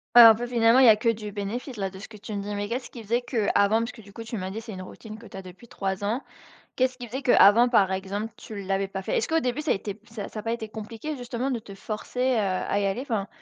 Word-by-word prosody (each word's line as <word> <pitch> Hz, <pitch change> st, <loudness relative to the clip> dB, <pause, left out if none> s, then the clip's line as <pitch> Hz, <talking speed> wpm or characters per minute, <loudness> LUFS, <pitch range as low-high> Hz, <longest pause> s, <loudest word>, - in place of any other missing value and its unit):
Ouais 240 Hz, -, +12 dB
un 225 Hz, -1 st, +11 dB
peu 240 Hz, +2 st, -4 dB
finalement 235 Hz, 0 st, +4 dB
il 265 Hz, -, +7 dB
y -, -, +10 dB
a 220 Hz, -, +8 dB
que 230 Hz, +2 st, +1 dB
du 210 Hz, -2 st, -2 dB
bénéfice 220 Hz, +5 st, -5 dB
là 195 Hz, -2 st, -2 dB
de 190 Hz, -, -11 dB
ce 220 Hz, -, -9 dB
que 215 Hz, -, -12 dB
tu 210 Hz, +1 st, -8 dB
me 200 Hz, -, -2 dB
dis, 205 Hz, +1 st, -4 dB
mais 205 Hz, 0 st, -2 dB
qu'est-ce 245 Hz, +4 st, -4 dB
qui 235 Hz, -3 st, -10 dB
faisait 235 Hz, +4 st, 0 dB
qu'avant, 220 Hz, -3 st, +2 dB
parce 230 Hz, +1 st, -2 dB
que 230 Hz, -, -14 dB
du 200 Hz, -1 st, -15 dB
coup 230 Hz, +3 st, -8 dB
tu 225 Hz, 0 st, -5 dB
m'as 185 Hz, 0 st, -4 dB
dit 215 Hz, +3 st, -5 dB
c'est 225 Hz, -1 st, -9 dB
une 185 Hz, -, -7 dB
routine 215 Hz, +3 st, -10 dB
que 230 Hz, -, -12 dB
tu 195 Hz, -, -10 dB
as 190 Hz, -, -7 dB
depuis 185 Hz, +6 st, -13 dB
3 195 Hz, -2 st, -3 dB
ans, 230 Hz, +7 st, -1 dB, 0.5 s
qu'est-ce 255 Hz, 0 st, +1 dB
qui 245 Hz, -, -6 dB
faisait 260 Hz, +5 st, -5 dB
qu'avant 235 Hz, 0 st, +6 dB
par 200 Hz, -6 st, +4 dB
exemple 200 Hz, +3 st, -3 dB
tu 210 Hz, -2 st, -8 dB
l'avais 195 Hz, 0 st, -1 dB
pas 190 Hz, 0 st, -5 dB
fait? -, -, -1 dB
Est-ce -, -, 0 dB
qu'au 325 Hz, 0 st, +2 dB
début 255 Hz, 0 st, -1 dB
ça 305 Hz, -, +1 dB
était 200 Hz, +1 st, -3 dB
ça 220 Hz, -3 st, -7 dB
ça 215 Hz, -, -6 dB
a -, -, -21 dB
pas 230 Hz, -, -1 dB
été 220 Hz, -2 st, -5 dB
compliqué 225 Hz, +7 st, -6 dB
justement 245 Hz, +1 st, -3 dB
de 250 Hz, -, 0 dB
te 210 Hz, -3 st, -10 dB
forcer, 215 Hz, +4 st, -6 dB
heu, 255 Hz, 0 st, +3 dB
à 200 Hz, 0 st, 0 dB
y 200 Hz, -, 0 dB
aller? 195 Hz, +5 st, -1 dB
Enfin, 220 Hz, -7 st, -2 dB
220 Hz, 305 wpm, -26 LUFS, 200-240 Hz, 0.5 s, Ouais